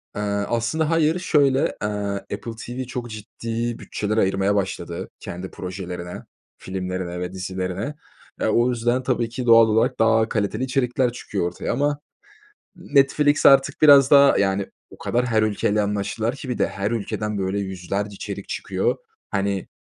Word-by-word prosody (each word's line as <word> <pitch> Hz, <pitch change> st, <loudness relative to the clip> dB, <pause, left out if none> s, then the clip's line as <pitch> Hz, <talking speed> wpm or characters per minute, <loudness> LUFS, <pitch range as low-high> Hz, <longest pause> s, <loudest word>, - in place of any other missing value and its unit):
Eee, 105 Hz, -, -3 dB, 0.3 s
aslında 120 Hz, +7 st, 0 dB
hayır, 165 Hz, +1 st, +2 dB
şöyle, 140 Hz, -6 st, +3 dB, 0.2 s
eee, 105 Hz, -, 0 dB, 0.5 s
Apple 115 Hz, +3 st, -5 dB
TV 125 Hz, +2 st, -4 dB
çok 120 Hz, -1 st, -5 dB
ciddi 115 Hz, +2 st, -4 dB
bütçeler 110 Hz, +1 st, -3 dB
ayırmaya 95 Hz, 0 st, +2 dB
başladı 85 Hz, -3 st, -3 dB
kendi 90 Hz, +2 st, -7 dB
projelerine, 90 Hz, -1 st, -6 dB, 0.4 s
filmlerine 90 Hz, -1 st, -4 dB
ve 90 Hz, +1 st, -4 dB
dizilerine. 95 Hz, +9 st, -4 dB, 0.5 s
Eee, -, -, +2 dB
o 120 Hz, +2 st, +3 dB
yüzden 120 Hz, +1 st, 0 dB
tabii 120 Hz, -3 st, 0 dB
ki, 125 Hz, +1 st, -5 dB
doğal 115 Hz, -1 st, +7 dB
olarak 110 Hz, +1 st, +1 dB
daha 110 Hz, 0 st, +3 dB
kaliteli 110 Hz, +3 st, -1 dB
içerikler 125 Hz, -1 st, +1 dB
çıkıyor 100 Hz, -6 st, -3 dB
ortaya. 90 Hz, -, -4 dB
Ama 145 Hz, +2 st, 0 dB, 0.8 s
Netflix 145 Hz, -2 st, +3 dB
artık 135 Hz, +2 st, +5 dB
biraz 140 Hz, -2 st, +8 dB
daha, 140 Hz, -1 st, +7 dB
yani, 95 Hz, 0 st, +1 dB, 0.2 s
o -, -, -14 dB
kadar 125 Hz, +1 st, 0 dB
her 110 Hz, -2 st, +2 dB
ülkeyle 105 Hz, 0 st, +1 dB
anlaştılar 105 Hz, +4 st, -1 dB
ki 130 Hz, -, -9 dB
bir 125 Hz, -, -2 dB
de. -, -, +2 dB
Her 100 Hz, +2 st, -3 dB
ülkeden, 105 Hz, -2 st, -3 dB
böyle, 95 Hz, +1 st, -1 dB
yüzlerce 100 Hz, +2 st, -4 dB
içerik -, -, -7 dB
çıkıyor. -, -, -1 dB, 0.3 s
Hani, 100 Hz, -1 st, -1 dB
110 Hz, 150 wpm, -23 LUFS, 95-130 Hz, 0.8 s, biraz